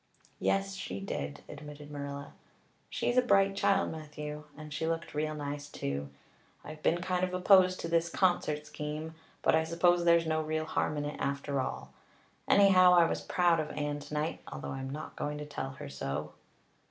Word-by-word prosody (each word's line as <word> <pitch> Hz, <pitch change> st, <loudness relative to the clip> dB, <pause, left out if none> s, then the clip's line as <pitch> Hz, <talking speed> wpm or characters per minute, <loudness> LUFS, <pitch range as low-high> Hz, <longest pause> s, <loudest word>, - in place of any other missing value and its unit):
"Yes, 195 Hz, 0 st, +1 dB
she 195 Hz, 0 st, -5 dB
did," 195 Hz, -6 st, -4 dB
admitted 150 Hz, 0 st, -10 dB
Marilla. 140 Hz, -1 st, -6 dB, 0.6 s
"She's 240 Hz, -, -1 dB
a -, -, +8 dB
bright 195 Hz, -4 st, +3 dB
child, 195 Hz, 0 st, +2 dB
Matthew. 150 Hz, -1 st, -7 dB
And 155 Hz, -1 st, -8 dB
she 160 Hz, +2 st, -2 dB
looked 165 Hz, 0 st, -2 dB
real 155 Hz, +1 st, -1 dB
nice 145 Hz, 0 st, -5 dB
too. 70 Hz, -, -4 dB, 0.5 s
I've 155 Hz, 0 st, -9 dB
been 175 Hz, +3 st, +2 dB
kind 185 Hz, -1 st, 0 dB
of 180 Hz, 0 st, 0 dB
opposed 185 Hz, 0 st, +5 dB
to -, -, -3 dB
this 165 Hz, 0 st, +2 dB
concert 165 Hz, -5 st, +1 dB
scheme, 150 Hz, +1 st, -5 dB, 0.3 s
but -, -, +4 dB
I 160 Hz, -, +4 dB
suppose 175 Hz, +2 st, +3 dB
there's 170 Hz, -1 st, +5 dB
no 155 Hz, 0 st, +1 dB
real 155 Hz, 0 st, -1 dB
harm 150 Hz, -1 st, -1 dB
in 145 Hz, -, -2 dB
it 145 Hz, -, -5 dB
after 140 Hz, 0 st, -1 dB
all. -, -, -5 dB, 0.5 s
Anyhow, 185 Hz, -3 st, +7 dB
I 170 Hz, -1 st, +7 dB
was -, -, -1 dB
proud 175 Hz, -2 st, +2 dB
of 155 Hz, -1 st, -2 dB
Anne 145 Hz, 0 st, -1 dB
tonight, 150 Hz, +2 st, -3 dB
although -, -, -5 dB
I'm 135 Hz, 0 st, -4 dB
not 150 Hz, +3 st, -6 dB
going 150 Hz, 0 st, -3 dB
to 150 Hz, -, -5 dB
tell 145 Hz, -2 st, -4 dB
her 135 Hz, -, -8 dB
so." 70 Hz, 0 st, -4 dB
155 Hz, 180 wpm, -31 LUFS, 145-175 Hz, 0.6 s, a